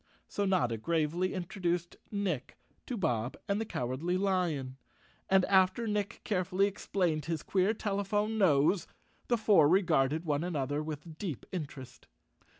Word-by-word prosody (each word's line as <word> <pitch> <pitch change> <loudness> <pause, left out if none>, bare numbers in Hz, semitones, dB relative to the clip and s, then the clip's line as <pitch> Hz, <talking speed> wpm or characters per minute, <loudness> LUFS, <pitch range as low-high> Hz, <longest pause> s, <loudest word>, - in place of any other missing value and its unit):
So 205 - -1
Notta 170 -12 +1
gravely 165 - 0
introduced 175 -2 -2
Nick 190 - -3 0.3
to 250 - -3
Bob 125 - -1
and 200 +2 0
the - - -2
Cowardly 135 - -1
Lion 175 -9 0 0.5
and, 190 -1 +5
after 190 +4 +3
Nick 210 -2 -2
carefully 185 -1 +1
explained 180 -6 -1
his 165 0 -2
queer 190 +2 +2
telephone 210 +1 -1
nose, 160 0 +3 0.4
the 240 - +2
four 195 -9 +5
regarded 160 -4 +2
one 150 0 0
another 145 -4 -1
with 155 +1 -7
deep 170 - -4
interest. 140 -7 -7
175 Hz, 135 wpm, -31 LUFS, 150-195 Hz, 0.5 s, and